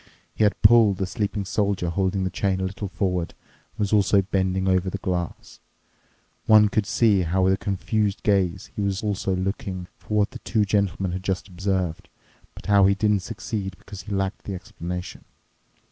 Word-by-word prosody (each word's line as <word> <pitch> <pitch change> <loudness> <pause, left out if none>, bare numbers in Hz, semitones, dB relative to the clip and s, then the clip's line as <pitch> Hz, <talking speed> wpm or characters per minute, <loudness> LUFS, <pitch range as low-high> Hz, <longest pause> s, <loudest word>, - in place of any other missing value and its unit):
He - - 0
had 105 - +2
pulled 105 -3 +6
the 95 - -1
sleeping 100 0 -3
Soldier 100 -3 0
holding 95 +1 0
the 95 - -2
chain 95 -2 0
a - - -2
little 100 +2 -4
forward 90 -3 -2 0.4
and - - -33
was 105 0 0
also 100 -1 +4
bending 95 -1 0
over 95 0 +2
the 100 - -4
glass. 90 -3 -4 0.9
One 105 -1 +7
could 105 -1 0
see 110 -3 +3
how 90 +2 +1
with 95 +1 +4
a - - 0
confused 100 +1 -1
gaze 95 -3 +1
he - - -2
also 100 0 -1
was 95 0 -2
looking 95 -2 -4
for 105 - -3
what 105 +2 +2
the 125 - -9
two 110 -3 0
gentlemen 95 -2 0
had 90 +1 -4
just 95 +1 -2
observed, 95 -3 -2 0.5
but - - -12
how 100 -1 +5
he 100 - +3
didn't 105 0 +2
succeed 100 -2 -5
because 100 +2 -10
he 105 - -10
lacked 95 0 -2
the 100 - -4
explanation. 90 0 -7
95 Hz, 185 wpm, -24 LUFS, 95-105 Hz, 0.9 s, One